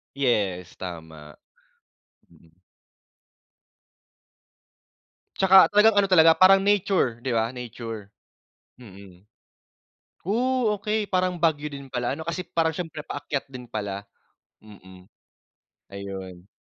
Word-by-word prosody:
Yes, 100 -10 -1
tama. 80 -4 -9 1.0
Mm. 80 0 -23 2.9
'Tsaka 190 0 +6
talagang 210 +2 +5
ano 195 - -1
talaga 165 -3 +6
parang 185 +3 +6
nature, 195 - +1
'di 130 - -4
ba? 115 +1 0
Nature. 115 -4 -8 0.7
Mm. 100 -5 -15 1.0
O, 195 - -1 0.5
okey 215 0 -1
parang 185 -2 -1
Baguio 150 -3 0
din 140 -1 -9
pala 130 +1 -3
ano 160 - -8
kasi 170 +2 -3
parang 165 -3 -1
siyempre 160 -2 -6
paakyat 145 -1 -4
din 125 -3 -11
pala, 100 -2 -4 0.6
mm. 95 -3 -16 0.8
Ayun. 95 -2 -9
125 Hz, 100 wpm, -24 LUFS, -, 2.9 s, Tsaka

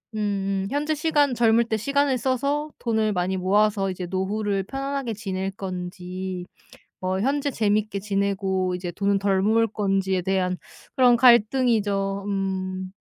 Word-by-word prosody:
음음 195 -2 -1
현재 300 +2 0
시간 295 -4 +2
젊을 230 0 +4
때 220 -1 -1
시간을 280 +3 +1
써서 280 +4 -1
돈을 220 -3 0
많이 185 +1 -1
모아서 195 +1 +2
이제 185 0 -5
노후를 195 +1 -1
편안하게 270 0 -3
지낼 195 -2 -3
건지 185 -1 -6 0.5
뭐 185 +1 -1
현재 285 +3 0
재밌게 210 -2 0
지내고 195 -2 -1
이제 180 -1 -5
돈은 200 +2 0
덜 195 -1 +1
모을 225 +2 +3
건지에 195 -3 0
대한 185 -1 0 0.4
그런 250 -2 +6
갈등이죠. 215 -5 +3
음. 190 -1 -3
200 Hz, 285 characters per minute, -24 LUFS, 190-235 Hz, 0.5 s, 그런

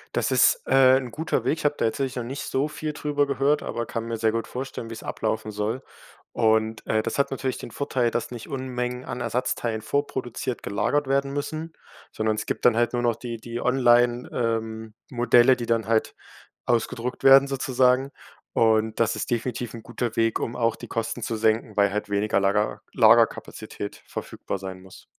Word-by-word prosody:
Das - - +1
ist, - - +4
äh, 130 -1 +6
'n 125 -3 -4
guter 160 +5 -1
Weg. 160 - +1
Ich - - -7
habe 145 0 +3
da - - +1
tatsächlich 130 +3 -1
noch 125 - -3
nicht 135 +4 -5
so 135 +3 0
viel 155 0 -5
drüber 145 -1 0
gehört, 140 +2 +1
aber 120 0 -3
kann 115 0 -4
mir 115 0 -3
sehr 110 0 +2
gut 115 0 -2
vorstellen, 125 -2 -6
wie - - -6
es 110 - -9
ablaufen 110 0 -2
soll. 105 +5 -3 0.5
Und, 110 -1 +1
äh, 110 0 +1
das 115 +4 -3
hat 140 - +2
natürlich 130 -1 -2
den 120 - -8
Vorteil, 130 -4 0
dass 120 - -3
nicht 120 -2 -8
Unmengen 125 -2 -3
an 120 - -5
Ersatzteilen 120 -2 -1
vorproduziert 125 -1 -3
gelagert 140 +8 0
werden 140 0 +1
müssen, 155 +3 -4 0.4
sondern 110 0 0
es 110 - -4
gibt - - -3
dann 120 -2 +6
halt 120 +1 +1
nur 120 - 0
noch 120 -2 +2
die 120 -2 -6
die 120 +1 -6
Online 120 -1 +3
ähm, 110 -2 -2 0.2
Modelle, 120 +1 +5
die 120 -2 -5
dann 115 -2 +1
halt 115 -1 +1 0.5
ausgedruckt 120 +1 -1
werden 135 +1 +8
sozusagen. 130 0 +2 0.4
Und 110 -1 +2
das 115 -1 +2
ist - - -4
definitiv 120 -1 -2
'n 115 - -9
guter 120 0 -4
Weg, 115 -1 +1
um 120 - -3
auch 115 -1 +1
die - - -10
Kosten 115 +1 -3
zu 115 +1 -2
senken, 110 0 0
weil 100 -1 +4
halt 105 0 -3
weniger 100 0 +1
Lager 100 +2 +1
Lagerkapazität 115 -1 +2
verfügbar 100 - -5
sein 95 -1 -7
muss. 95 0 -15
120 Hz, 195 wpm, -25 LUFS, 110-130 Hz, 0.5 s, werden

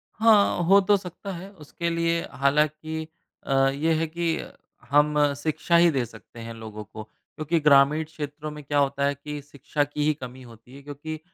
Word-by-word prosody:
हाँ, 215 -5 +4
हो 195 +4 +6
तो 205 +2 +4
सकता 190 +1 -8
है 185 +3 -8
उसके 170 -1 -5
लिए 170 0 0
हालाँकि 150 +4 0 0.4
अ, - - -4 0.2
ये 150 +4 0
है 160 +1 +1
कि 165 +1 -1 0.5
हम 150 0 +3
शिक्षा 155 +3 0
ही 170 0 +6
दे 130 -5 0
सकते 115 +1 -14
हैं 115 0 -7
लोगों 110 -1 -8
को। 110 +1 -10
क्योंकि 155 +8 -4
ग्रामीण 150 +1 +5
क्षेत्रों 150 -1 -7
में 150 0 -9
क्या 145 +1 -1
होता 140 0 +1
है 140 - +1
कि, 145 +1 -7
शिक्षा 145 +1 -3
की 145 +1 -3
ही 155 - +3
कमी 130 -2 -10
होती 115 +2 -15
है 140 - -11
क्योंकि 145 +2 -7
150 Hz, 185 wpm, -25 LUFS, 140-165 Hz, 0.5 s, हो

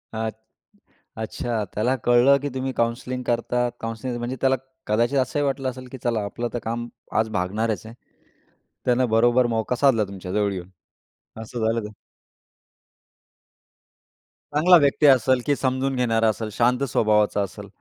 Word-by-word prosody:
आत 110 0 -2 0.9
अच्छा. 110 0 -3
त्याला 120 +5 +1
कळलं, 120 +3 +5
की 145 - -2
तुम्ही 130 0 -2
काउन्सिलिंग 125 +2 -2
करता. 120 +1 0
काउन्सिलिंग 115 +2 -4
म्हणजे 120 +2 -3
त्याला 135 0 +3 0.3
कदाचित 120 +6 +1
असंही 130 +3 0
वाटलं 135 -1 -1
असेल, 130 0 -9
की 130 - -7
चला 115 -3 0
आपलं 120 +4 -4
तर 120 - -2
काम 120 +1 -3 0.3
आज 110 0 +1
भागणारच 110 +3 -2
आहे. 115 +1 -10 0.9
त्यानं 125 0 +2
बरोबर 120 +2 +4
मौका 115 +1 -1
साधला 125 -4 +3
तुमच्या 95 -2 -8
जवळ 105 -1 +1
येऊन. 90 -1 -7 0.7
असं 110 0 -3
झालं 115 +1 +1
तर. 105 - -10 2.6
चांगला 170 +5 +6
व्यक्ती 145 +2 +2
असेल? 130 -1 +4
की 145 - +2
समजून 130 0 -1
घेणारा 115 -3 +2
असेल, 110 0 -3
शांत 125 +3 +2
स्वभावाचा 105 -2 +2
असेल. 100 +1 -6
120 Hz, 145 wpm, -23 LUFS, 110-130 Hz, 2.6 s, चांगला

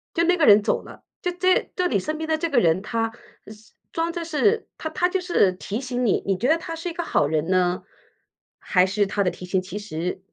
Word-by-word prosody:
就 335 - +3
那 360 +1 +3
个 310 - +3
人 205 0 +7
走 - - 0
了， - - -14 0.2
就 360 - -1
这 370 +1 +1
就 365 - 0
你 205 - +1
身 310 +10 -3
边 320 0 -4
的 315 0 +1
这 335 +1 -2
个 280 - 0
人 170 -1 +2
他 225 +1 -2 0.4
是 215 +1 -14 0.2
装 330 +1 -1
着 340 -1 -4
是 410 +8 +1
他 315 - -4
他 355 +3 +1
就 380 - 0
是 345 - +3
提 205 +6 -5
醒 250 -1 -2
你， 205 - +1
你 195 -2 +1
觉 245 - 0
得 320 +2 +4
他 330 0 -6
是 335 +2 -5
一 - - -6
个 345 - -3
好 145 - +1
人 155 +1 -1
呢？ 180 -1 +1 0.8
还 185 -1 +4
是 205 +1 +1
他 200 +1 0
的 180 - +2
提 180 - -9
醒 185 +1 0
其 195 +2 -7
实 180 -2 -4
235 Hz, 265 characters per minute, -23 LUFS, -, 0.8 s, 人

